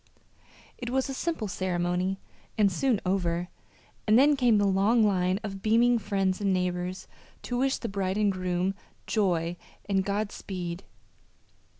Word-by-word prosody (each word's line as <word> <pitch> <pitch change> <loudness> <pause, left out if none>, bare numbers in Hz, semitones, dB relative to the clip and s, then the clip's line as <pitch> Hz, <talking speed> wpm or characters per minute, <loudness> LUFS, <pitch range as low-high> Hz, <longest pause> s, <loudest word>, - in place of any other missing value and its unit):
It 240 - -4
was 265 +2 0
a - - -3
simple 295 -6 -2
ceremony 180 0 -1 0.4
and 205 -2 +4
soon 230 +4 +1
over, 175 -2 0 0.6
and 215 +1 +6
then 290 +3 +6
came 245 -5 +4
the 205 - +3
long 200 +4 +3
line 185 -2 +2
of 195 -2 -6
beaming 235 +3 +4
friends 195 -2 -1
and 200 -1 +2
neighbors 180 0 -2 0.4
to 245 0 -2
wish 265 +1 +1
the 235 - -5
bride 195 -1 -2
and 210 -1 +3
groom 185 0 -1 0.3
joy 175 -5 0 0.3
and 195 -1 +1
God 205 +1 -1
speed. 180 -1 -6
195 Hz, 150 wpm, -28 LUFS, 185-220 Hz, 0.6 s, and